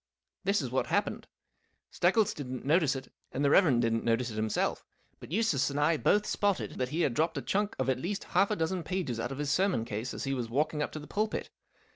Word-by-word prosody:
This 200 -4 +1
is 125 - -4
what 130 - 0
happened. - - -1 0.6
Steggles 195 +4 +3
didn't 130 -3 -6
notice 150 -1 +3
it, 135 - -8 0.2
and 140 - -1
the 140 - +4
Rev. 150 -11 +5
didn't 115 -1 +1
notice 115 +1 +1
it - - -7
himself, 110 0 -1 0.4
but - - -11
Eustace 170 - +2
and 140 +1 -2
I 155 +3 +3
both 210 +7 +3
spotted 205 -2 -1
that 125 -1 0
he 160 +5 -1
had 135 - +2
dropped 160 +5 0
a - - -1
chunk 205 +1 0
of 130 - -1
at 130 -1 +1
least 195 +7 -3
half 195 +3 +2
a 210 - +1
dozen 175 +1 -1
pages 165 -9 -3
out 120 +3 -3
of 135 - -5
his 145 -1 -1
sermon 150 - +2
case 115 +3 -4
as - - -5
he 135 - -1
was 120 -4 -3
walking 150 +4 0
up - - -2
to 155 - -5
the 150 - -9
pulpit. 215 +5 -2
145 Hz, 235 wpm, -30 LUFS, 125-185 Hz, 0.6 s, Rev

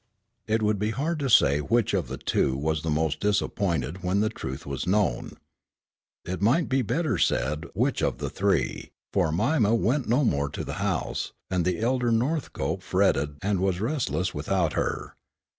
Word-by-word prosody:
It 110 0 +1
would 105 -1 +1
be 105 +1 0
hard 155 +8 -1
to 140 -2 -1
say 70 - +5
which 115 +9 +1
of - - 0
the - - -5
two 65 0 0
was 80 +2 -1
the 80 - -3
most 80 0 0
disappointed 95 - 0
when 90 +2 +1
the 110 +1 +2
truth 65 - -6
was 70 +4 -4
known. 100 +2 0 0.9
It 90 +2 -4
might 130 +11 +3 0.2
better 160 - 0
be - - -2
said 75 +4 +1
which - - +1
of - - 0
the 70 0 -4
three, 100 -3 0 0.2
for 80 - +2
Mima 110 - +2
went 125 +4 0
no 130 +4 +3
more 70 -7 +1
to - - -5
the - - -5
house, - - -2 0.2
and 90 -3 +1
the 90 +1 0
elder 120 +1 +1
Northcope 130 +7 -1
fretted 70 +1 +1
and 100 -1 +1
was 95 -1 0
restless 115 -6 -1
without 80 +2 0
her. - - -2
95 Hz, 175 wpm, -26 LUFS, 80-115 Hz, 0.9 s, say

